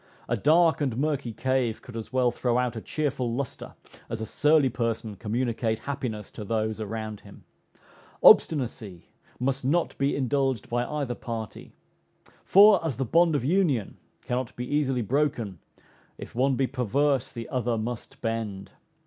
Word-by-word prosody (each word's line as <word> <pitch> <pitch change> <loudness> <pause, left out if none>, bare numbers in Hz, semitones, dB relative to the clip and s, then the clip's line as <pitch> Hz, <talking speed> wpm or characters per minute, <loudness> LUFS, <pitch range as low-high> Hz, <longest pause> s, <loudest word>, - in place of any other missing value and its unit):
A - - +1
dark 160 +1 +4
and 130 -5 -1
murky 140 -3 -1
cave 130 -1 -1
could 125 - -11
as 115 +2 -6
well 130 -2 +2
throw 120 -1 0
out 125 -1 0
a 110 - -5
cheerful 130 -5 -2
lustre, 135 -1 -5 0.3
as 115 - -4
a 110 - -3
surly 150 +3 +3
person 115 -3 -2
communicate 115 +2 -1
happiness 115 -5 -5
to 110 - -8
those 110 +1 -1
around 110 0 -5
him. - - -15 0.8
Obstinacy 115 - +4 0.3
must 135 +2 -1
not 160 +7 +1
be 140 +1 +1
indulged 135 -3 0
by 120 +1 +1
either 145 -5 -3
party; 115 -3 -7 0.7
for, 200 -2 +7
as 150 -8 -2
the 135 - -1
bond 165 +5 +3
of 130 - -1
union 150 - +1 0.3
cannot 125 -1 -3
be 125 - -4
easily 135 -3 0
broken, 120 - -1 0.6
if - - -9
one 130 +2 +2
be 135 - +1
perverse 135 +1 0
the 115 -2 -7
other 120 -2 -1
must 115 +1 -6
bend. 110 -4 -3
125 Hz, 155 wpm, -26 LUFS, 115-140 Hz, 0.8 s, for